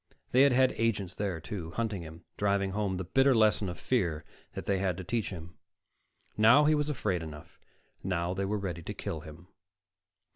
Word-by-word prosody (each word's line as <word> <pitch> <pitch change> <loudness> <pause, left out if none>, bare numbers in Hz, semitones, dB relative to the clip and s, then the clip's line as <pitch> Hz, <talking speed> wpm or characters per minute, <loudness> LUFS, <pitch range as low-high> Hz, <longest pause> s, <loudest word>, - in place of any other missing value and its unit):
They 130 - +5
had 140 0 +6
had 130 +1 +4
agents 105 -5 0
there, 95 -5 -3
too, 80 0 -6
hunting 105 0 -2
him, 80 +1 -11
driving 100 -1 +1
home 100 -2 -1
the 95 - -3
bitter 135 +8 +3
lesson 110 -3 +3
of 90 - -7
fear 90 -12 0 0.3
they 100 -1 -1
had 95 -3 0
to 95 - -5
teach 115 +4 -2
him. 85 -2 -9 0.8
Now 115 +8 +6
he 155 - +5
was 150 0 0
afraid 105 - -1
enough; 75 -2 -10 0.4
now 90 -1 -1
they 95 +1 -2
were 105 +2 -1
ready 90 -4 -4
to - - -6
kill 80 - -4
him. 80 +3 -12
100 Hz, 185 wpm, -30 LUFS, 85-115 Hz, 0.8 s, had